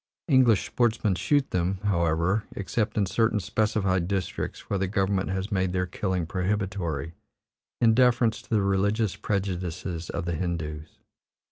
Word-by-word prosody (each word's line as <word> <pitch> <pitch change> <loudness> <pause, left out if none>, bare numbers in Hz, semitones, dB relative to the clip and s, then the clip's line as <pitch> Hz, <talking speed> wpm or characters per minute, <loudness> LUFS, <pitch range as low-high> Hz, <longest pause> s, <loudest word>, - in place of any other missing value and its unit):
English 130 - +4
sportsmen 115 -4 +1
shoot 135 +10 +1
them, 90 +2 0
however, 85 +1 +1
except 105 +3 -2
in 105 - +3
certain 110 +3 +1
specified 95 -2 0
districts 95 -3 -3
where 100 - -1
the 95 - 0
government 95 0 0
has 95 +3 -3
made 95 -2 0
their 90 0 +1
killing 90 -1 -2
prohibitory, 90 -5 -2 0.7
in 115 -2 +5
deference 120 -2 +3
to - - -23
the 105 -3 +2
religious 100 +2 +1
prejudices 90 -3 -3
of 80 +1 -3
the 85 - -1
Hindoos. 80 -3 -4
95 Hz, 140 wpm, -26 LUFS, 90-105 Hz, 0.7 s, in